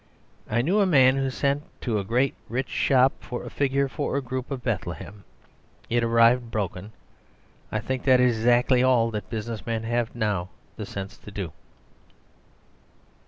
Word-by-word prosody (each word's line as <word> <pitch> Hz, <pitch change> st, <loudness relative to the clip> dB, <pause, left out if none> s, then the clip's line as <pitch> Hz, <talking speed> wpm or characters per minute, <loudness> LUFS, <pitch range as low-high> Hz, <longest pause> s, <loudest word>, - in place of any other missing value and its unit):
I 115 Hz, +2 st, +1 dB
knew 185 Hz, +9 st, +2 dB
a 200 Hz, -, +4 dB
man 130 Hz, -6 st, +5 dB
who 135 Hz, 0 st, 0 dB
sent 140 Hz, +2 st, 0 dB, 0.2 s
to 110 Hz, -5 st, 0 dB
a -, -, -3 dB
great 125 Hz, +7 st, +1 dB, 0.2 s
rich 130 Hz, +3 st, -2 dB
shop 130 Hz, 0 st, +3 dB
for 125 Hz, -, -6 dB
a -, -, -8 dB
figure 140 Hz, 0 st, +1 dB
for 145 Hz, 0 st, -2 dB
a -, -, 0 dB
group 130 Hz, 0 st, -4 dB
of 135 Hz, -4 st, -5 dB
Bethlehem. 100 Hz, -2 st, -4 dB, 0.7 s
It 120 Hz, 0 st, +2 dB
arrived 115 Hz, +1 st, +4 dB
broken. 105 Hz, -2 st, -4 dB, 0.8 s
I 110 Hz, -, -1 dB
think 130 Hz, +3 st, -3 dB
that 130 Hz, -2 st, +6 dB
is 125 Hz, -2 st, +3 dB
exactly 125 Hz, +2 st, +4 dB
all 125 Hz, -3 st, +3 dB
that 105 Hz, -3 st, -5 dB
business 110 Hz, -1 st, -4 dB
men 115 Hz, -1 st, -2 dB
have 120 Hz, 0 st, -1 dB
now 105 Hz, -6 st, -1 dB, 0.3 s
the -, -, -6 dB
sense 100 Hz, +2 st, -7 dB
to -, -, -11 dB
do. 95 Hz, -5 st, -5 dB
120 Hz, 165 wpm, -25 LUFS, 110-130 Hz, 0.8 s, that